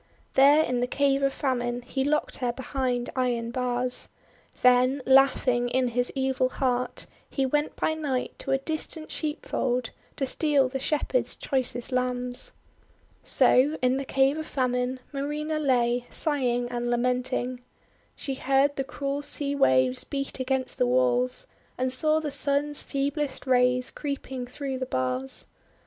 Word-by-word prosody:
There 285 +3 +6
in 250 -4 -1
the 245 - 0
Cave 275 +1 +1
of 275 0 +2
Famine 245 -3 -2
he 265 +2 -2
locked 300 +2 0
her 245 -2 -1
behind 250 -1 -2
iron 240 -3 -1
bars. 250 0 -1 0.5
Then, 250 +2 +4
laughing 265 -2 +4
in 255 0 +1
his 245 +1 0
evil 265 -1 +1
heart, 250 -2 -2 0.2
he 270 - 0
went 295 +3 0
by 315 - 0
night 285 -5 -2
to - - -6
a 270 - +3
distant 310 +2 -4
sheepf 300 -2 -4
old 250 -2 0 0.2
to 270 - -1
steal 280 -1 +2
the 270 +1 -3
Shepherds' 300 - -1
choicest 255 -2 -2
lambs. 250 - 0 0.7
So 285 +5 +4
in 255 +1 +3
the 275 - -2
Cave 270 +3 +2
of 315 - -5
Famine, 250 -1 -1
Marina 300 +2 -2
lay, 245 -3 +1
sighing 250 -6 -1
and 240 0 -3
lamenting. 250 +1 -1 0.5
She 275 - -4
heard 275 +2 +1
the 270 - 0
cruel 280 +1 -4
sea 290 -1 -1
waves 130 - +3
beat 275 -1 -4
against 260 0 -1
the - - +3
walls, 125 0 +1 0.3
and 255 0 0
saw 310 +4 +4
the 305 -2 -4
Sun's 285 +1 +3
feeblest 280 0 -2
rays 250 -1 +2
creeping 265 -3 -5
through 265 0 -5
the 260 - -3
bars. 130 - -1
260 Hz, 150 wpm, -26 LUFS, 245-280 Hz, 0.7 s, There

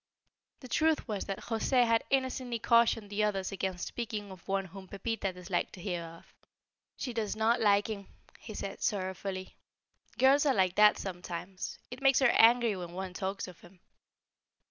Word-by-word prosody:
The 255 - -9
truth 315 +4 +1
was 210 -3 -3
that 195 -1 -3
José 245 +2 +2
had 230 -1 +2
innocently 260 -2 0
cautioned 230 -2 +3
the 210 +1 0
others 195 -2 -1
against 190 -2 -3
speaking 210 -4 -5
of 185 -2 -13
one 195 0 0
whom 190 +1 -11
Pepita 200 +1 -3
disliked 180 0 -3
to - - -10
hear 175 -2 -2
of. 165 0 -13 0.6
"She 250 - -4
does 220 -3 -2
not 225 +2 +2
like 205 -1 +4
him," 200 -3 -5 0.3
he - - -9
said, - - -5
sorrowfully. 190 -2 -3 0.6
"Girls 275 +3 +5
are 270 - +3
like 185 -3 +3
that 210 +1 +6
sometimes. 180 0 -6
It 255 +2 -8
makes 270 -1 +5
her 270 -3 +5
angry 230 -1 +5
when 175 -2 -7
one 185 0 -5
talks 190 +1 -3
of 180 -2 -12
him." 175 +1 -17
205 Hz, 170 wpm, -31 LUFS, 190-235 Hz, 0.6 s, that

